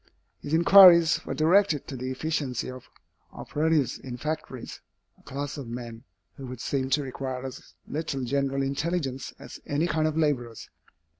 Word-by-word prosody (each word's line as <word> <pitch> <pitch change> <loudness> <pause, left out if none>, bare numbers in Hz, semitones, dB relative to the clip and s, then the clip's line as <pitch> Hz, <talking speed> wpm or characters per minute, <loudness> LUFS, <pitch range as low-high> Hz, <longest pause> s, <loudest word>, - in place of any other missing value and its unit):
His 145 - -2
inquiries 170 -1 +7
were - - -3
directed 160 -1 +3
to 135 - -6
the 130 +1 -4
efficiency 130 -3 -2
of 130 -1 -12 0.4
operatives 155 -3 0
in 125 -2 -7
factories, 145 -3 -5 0.4
a - - -23
class 145 +2 -5
of 135 - -7
men 120 0 -8 0.3
who 135 -2 -8
would 125 -1 -8
seem 130 +2 -2
to 145 +2 +1
require 130 -1 -5
as 130 0 -10
little 145 -3 -3
general 135 +1 0
intelligence 140 -1 -2
as - - -11
any 145 +3 0
kind 155 -2 +1
of 155 0 -2
laborers. 125 -8 -1
140 Hz, 155 wpm, -27 LUFS, 130-155 Hz, 0.4 s, inquiries